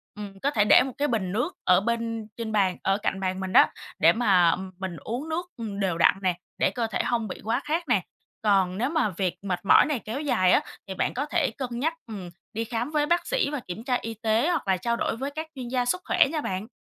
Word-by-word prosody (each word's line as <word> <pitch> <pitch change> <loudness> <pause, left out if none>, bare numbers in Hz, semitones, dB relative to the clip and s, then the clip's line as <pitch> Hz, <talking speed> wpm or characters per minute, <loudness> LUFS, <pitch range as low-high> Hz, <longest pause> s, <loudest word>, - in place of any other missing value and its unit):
ừm, 200 -2 -8
có 280 - 0
thể 215 -7 +3
để 210 - +7
một 260 -1 -5
cái 290 - +1
bình 210 -8 -1
nước 245 - -1
ở 180 +1 +5
bên 230 0 -2
trên 230 -2 -4
bàn, 195 -4 +2
ở 195 +1 +2
cạnh 190 -2 -2
bàn 185 -1 -2
mình 190 -1 -4
đó, - - +8 0.3
để 165 +1 +6
mà, 190 -7 +4
ừm, 185 +2 -2
mình 190 -3 -4
uống 250 - -5
nước, 335 +3 -2
ừm, 215 -4 -5
đều 185 -4 0
đặn 170 - +5
nè, 185 -2 0 0.2
để - - +3
cơ 235 -2 0
thể 220 - -1
hông 230 -2 0
bị 185 - -7
quá 230 +5 0
khát 325 +3 -1
nè. 210 -8 +2 0.4
Còn 195 -3 +2
nếu 245 +5 0
mà 315 -8 +1
việc 185 -1 -1
mệt 185 -3 -2
mỏi - - +7
này 295 -5 -1
kéo 225 +6 -5
dài 185 -11 +2
á, - - +5 0.3
thì 190 - -4
bạn 190 - -1
có - - -2
thể 300 -3 +1
cân 260 -3 -3
nhắc, 320 +5 +1
ừm, 200 -5 -7 0.2
đi 225 - -2
khám 235 +4 -3
với 300 -1 +2
bác 345 +2 +1
sĩ - - +1
và 295 - -2
kiểm 180 +5 -6
tra 250 -1 +1
y 225 - -5
tế 225 +8 +2
hoặc 335 - -1
là 190 -1 +3
trao 235 +6 -1
đổi 230 - -2
với 275 +3 -3
các 315 +2 -5
chuyên 255 -2 -6
gia 250 0 0
sức 360 +9 0
khỏe - - +4
nha 315 -2 -1
bạn. 190 -3 -3
225 Hz, 265 wpm, -26 LUFS, 190-270 Hz, 0.4 s, đó